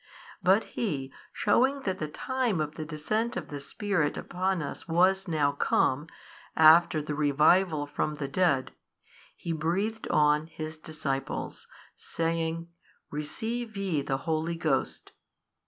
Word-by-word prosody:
But 190 +4 +4
He 140 - -3 0.2
shewing 265 +6 +2
that 190 -5 -2
the 155 - -2
time 245 - -1
of 150 -1 -2
the 155 - -6
Descent 215 +10 -2
of - - -5
the 145 - -5
Spirit 160 +1 -1
upon 185 -1 -1
us 140 - -7
was 185 +4 +3
now 150 -4 +2
come, 145 +1 +1 0.5
after 160 0 +6
the 150 - -3
revival 150 +2 +3
from 150 +1 -2
the 145 -2 -4
dead, 140 -4 +1 0.6
He 170 - -5
breathed 190 +8 -1
on 150 0 +3
His 155 -1 -6
disciples, 150 -3 -4 0.3
saying, 165 0 -2 0.4
Receive 220 +10 -3
ye 185 -7 0
the 135 -1 -1
Holy 160 +2 -1
Ghost. 155 -5 -1
160 Hz, 130 wpm, -28 LUFS, 150-190 Hz, 0.6 s, after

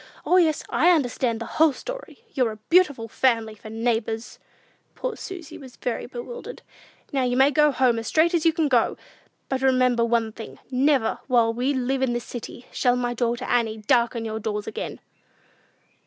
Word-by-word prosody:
O, 365 - +4
yes, 320 -4 +3
I 345 - +3
understand 250 -7 +1
the 230 - -5 0.2
whole 320 -3 +6
story! - - -8
You're 255 -4 +1
a 215 0 -17
beautiful 295 -10 +3
family 225 -2 +1
for 215 0 -12
neighbors!" 225 0 -2 0.6
Poor - - -3
Susy 355 -5 -8
was 260 -3 -12
fairly 245 - -3
bewildered. 260 - -8 0.5
"Now 270 - +1
you 250 0 0
may 270 +2 +5
go 300 +1 +4
home 250 -4 +2
as 225 - -6
straight 325 +2 +3
as 335 -3 +2
you 330 - +5
can 320 -1 0
go! 245 -5 +2 0.5
But 265 -1 -2
remember 255 -2 +3
one 230 -1 +1
thing: 225 0 -10
never, 265 -2 +2
while 235 -3 +3
we 255 +4 0
live 260 +1 -1
in 260 -2 +1
this 240 0 -2
city, 240 0 -8
shall 245 -1 +2
my 245 -1 -1
daughter 240 +1 -1
Annie 225 -3 +1
darken 230 +2 +1
your 220 0 -3
doors 210 -1 -3
again!" 480 - -5
250 Hz, 180 wpm, -24 LUFS, 230-285 Hz, 0.6 s, whole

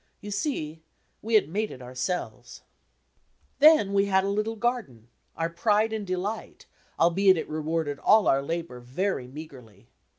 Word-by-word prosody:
You 205 - -8
see, 165 - -3 0.4
we 225 +1 0
had 215 - +5
made 210 +6 -2
it - - -10
ourselves! 130 +8 -5 1.0
Then 290 -10 +6
we 200 0 +3
had 190 -1 +2
a - - -1
litde 215 +2 -1
garden, 210 - -3 0.3
our 165 - 0
pride 210 +5 +1
and 210 -3 -4
delight, 190 +4 -4 0.3
albeit 185 +3 +4
it - - -3
rewarded 155 -1 -2
all 215 -1 +4
our 135 - +3
labour 165 -3 -4
very 130 +3 -3
meagrely. 125 -7 -12
180 Hz, 145 wpm, -26 LUFS, 145-210 Hz, 1.0 s, Then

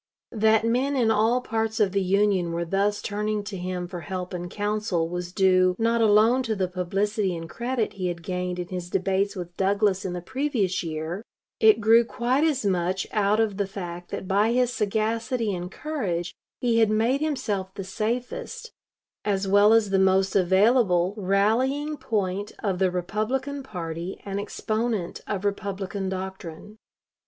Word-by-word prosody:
That 220 0 +3
men 255 +5 +1
in 235 -4 +3
all 225 +4 +3
parts 225 -1 -2
of 205 -3 +3
the 200 +1 +1
Union 190 -2 +2
were 170 0 -1
thus 200 +4 0
turning 210 0 -2
to 205 -1 -6
him 180 -1 -4
for 175 0 -6
help 180 +3 -5
and 175 0 -4
counsel 205 -4 -1
was 175 +1 -5
due, 185 -1 +3
not 230 +1 +2
alone 220 +4 +5
to 225 -4 -1
the 190 -2 0
publicity 195 +2 -1
and 165 0 -6
credit 235 +4 -2
he 185 -2 -3
had 170 -1 -4
gained 180 0 -3
in 175 -1 -5
his 180 -2 -5
debates 195 +2 0
with 175 -2 -7
Douglas 200 0 +2
in 185 -2 -3
the 180 - -3
previous 230 -4 -1
year; 160 +3 -4 0.4
it 220 0 +6
grew 225 +2 +6
quite 245 +4 0
as 295 -8 +1
much 185 0 0
out 210 0 +2
of 215 -3 +1
the 200 -2 0
fact 175 -3 -7
that 190 - -5
by 205 +4 +2
his 250 0 +2
sagacity 225 +1 -1
and 180 0 -5
courage 190 - -3 0.3
he 235 -2 +2
had 220 -2 +4
made 230 +6 +2
himself 210 -11 -2
the 195 - -5
safest, 230 - -4 0.5
as 200 -1 0
well 205 +2 +5
as 225 -3 +4
the 195 - +3
most 190 0 +3
available, 190 -1 +3
rallying 225 +10 +1
point 205 -7 -2
of 190 -4 0
the 190 -1 +3
Republican 215 +10 -2
party 175 -6 -6
and 200 0 -3
exponent 215 -2 -2
of 205 -1 -3
Republican 200 -1 -3
doctrine. 190 +1 -7
200 Hz, 165 wpm, -25 LUFS, 185-225 Hz, 0.5 s, it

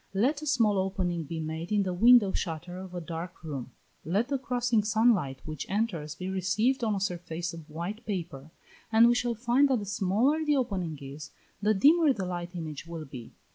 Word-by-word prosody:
Let 270 +9 +2
a 305 - -6
small 225 -8 +3
opening 180 -3 -1
be 160 +3 -5
made 160 +3 -5
in 205 -1 +3
the 185 -1 -2
window 225 +1 +6
shutter 175 0 -4
of 185 -1 -9
a - - -2
dark 170 +1 -7
room; 140 -6 -5 0.3
let 200 +10 0
the 275 -2 0
crossing 245 -4 +1
sun 220 +3 +4
light 135 -9 -4
which 155 -2 -6
enters, 180 -8 -2
be 185 +2 -6
received 195 +7 +1
on 215 -2 +1
a - - -1
surface 175 -3 -3
of 165 -2 -10
white 175 +9 -5
paper, 165 -8 -4 0.4
and 225 +1 +7
we 240 - +5
shall 240 -1 0
find 250 +5 +3
that 260 - +3
the 205 - -4
smaller 205 +11 +1
the 300 -1 +2
opening 185 - -2
is, 140 +2 -8 0.3
the 210 +1 +3
dimmer 300 - +5
the 195 -6 -4
light 175 0 -5
image 160 -2 -6
will 165 -2 -6
be. 125 -4 -10
190 Hz, 205 wpm, -29 LUFS, 165-230 Hz, 0.4 s, and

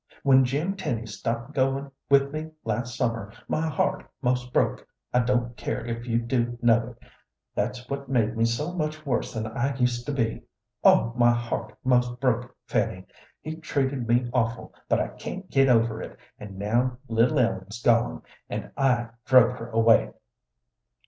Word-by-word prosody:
When 135 -1 +6
Jim 150 +10 -1
Tenny 120 - -3
stopped 115 +5 -4
goin' 135 0 0 0.2
with 140 0 +4
me 155 +1 -4 0.2
last 120 +2 -2
summer, 115 -4 -1 0.2
my 160 +1 0
heart 150 - 0 0.2
'most 125 -1 0
broke. - - +1 0.3
I 125 - +4
don't 120 -1 0
care 115 - -3
if 115 +1 -5
you 115 -1 +1
do 120 0 -1
know 115 0 +3
it. - - -21 0.5
That's 120 +4 -2
what 140 0 -5
made 115 -3 +1
me 115 0 +2
so 145 +9 -1
much 155 -2 -3
worse 125 -4 -1
than 110 -1 -3
I 120 +5 -1
used 125 -2 0
to - - 0
be. 115 -5 -1 0.4
Oh, 115 - +5
my 120 -1 +5
heart 120 -2 -2
'most 125 -1 +2
broke, 125 -2 0
Fanny! - - -1 0.4
He's 160 +1 -6
treated 135 -6 -1
me 120 +1 +2
awful, 115 -2 -1 0.2
but - - +3
I - - -1
can't 190 0 -7
get 135 -1 +4
over 115 -2 +3
it; - - -8 0.2
and 100 -2 -9
now 120 +5 0
little 115 +6 +2
Ellen's 105 -3 0
gone, 120 -1 +2 0.3
and - - -5
I 125 -4 +2 0.2
drove 125 -1 +5
her 115 +1 -7
away!" 115 0 +4
120 Hz, 170 wpm, -26 LUFS, 115-135 Hz, 0.5 s, When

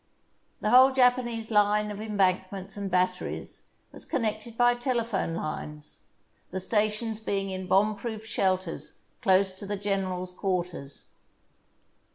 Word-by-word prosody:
The - - +1
whole 260 +2 +8
Japanese 245 -3 +2
line 210 0 +3
of 205 0 -6
embankments 195 -2 0
and 200 -1 -4
batteries 180 0 -1 0.3
was - - -8
connected 220 -1 -2
by 245 0 +5
telephone 235 -8 -1
lines, 150 -2 -5 0.5
the 190 - -3
sta 210 +3 +2
tions 220 +1 -4
being 195 -3 -2
in 185 0 -5
bomb 210 +3 +3
proof 220 0 -6
shelters 185 -5 -1 0.2
close 190 0 +4
to 190 +2 -8
the 205 0 -2
gen 195 -1 0
erals' 180 0 -4
quarters. 180 -8 -3
205 Hz, 135 wpm, -28 LUFS, 185-220 Hz, 0.5 s, whole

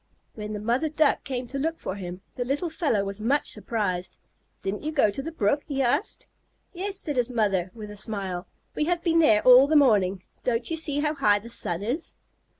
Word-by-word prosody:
When 210 -1 -6
the 210 - -4
mother 240 +9 0
Duck 305 0 +2
came 255 -2 -4
to 275 - -4
look 325 +3 -1
for - - -5
him, 180 -1 -7
the 245 - -3
little 290 +7 -2
fellow 290 - 0
was 200 +1 -5
much 275 +7 +1
surprised. 185 -6 -3 0.5
"Didn't 195 +2 -3
you 310 - -3
go 270 -9 +3
to 235 - -4
the 325 +4 -5
brook?" 280 0 +1
he 275 -2 0
asked. 285 - 0 0.5
"Yes," 390 +2 -2
said 295 -8 -2
his 245 0 +2
mother, 200 -7 0
with 210 -2 -8
a 210 - -10
smile. 195 -4 -4 0.3
"We 300 - 0
have 345 +1 0
been 335 -1 +3
there 220 -10 +5
all 255 +2 +8
the 310 - +1
morning. 200 -9 +4 0.2
Don't 235 +3 -1
you - - +1
see 290 -3 0
how 300 0 0
high 210 -8 +3
the 230 +3 -8
sun 175 -4 +1
is?" 260 +10 -3
245 Hz, 215 wpm, -26 LUFS, 205-300 Hz, 0.5 s, all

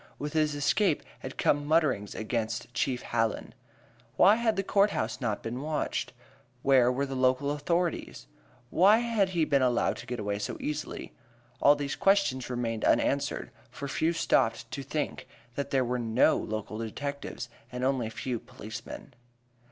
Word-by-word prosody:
With 150 0 -5
his 155 -2 +2
escape 150 +4 +2 0.2
had 130 - -8
come 145 0 +2
mutterings 145 -10 +1
against 110 +1 -3
Chief 125 0 -1
Hallen. 115 -2 -1 0.6
Why 200 - +7
had 235 -2 +1
the 195 - 0
court 200 +1 +3
house - - -3
not 110 -5 -2
been 120 +3 -4
watched? 155 +1 -2 0.5
Where 130 -3 +5
were 135 +2 0
the 135 - -6
local 130 +2 +2
authorities? 170 - -1 0.5
Why 200 +5 +6
had 230 -5 +1
he 170 -4 +1
been 140 -2 +2
allowed 125 -2 +2
to - - -10
get 125 -1 -4
away 100 -1 -2
so 105 - -4
easily? 150 0 -4 0.5
All 145 - +7
these 145 -1 -3
questions 195 -11 +2
remained 115 -3 -2
unanswered, - - +1 0.2
for 140 - -6
few 160 +4 +1
stopped 165 -1 +1
to - - -4
think - - -3 0.3
that 140 +3 -3
there 130 -2 +2
were 125 +1 -1
no 120 +6 +3
local 110 0 -4
detectives, 140 +6 -5 0.2
and 125 +1 -4
only 130 -3 +1
a - - -5
few 120 +1 -3
local - - -20
policemen. - - -8
135 Hz, 165 wpm, -29 LUFS, 120-155 Hz, 0.6 s, Why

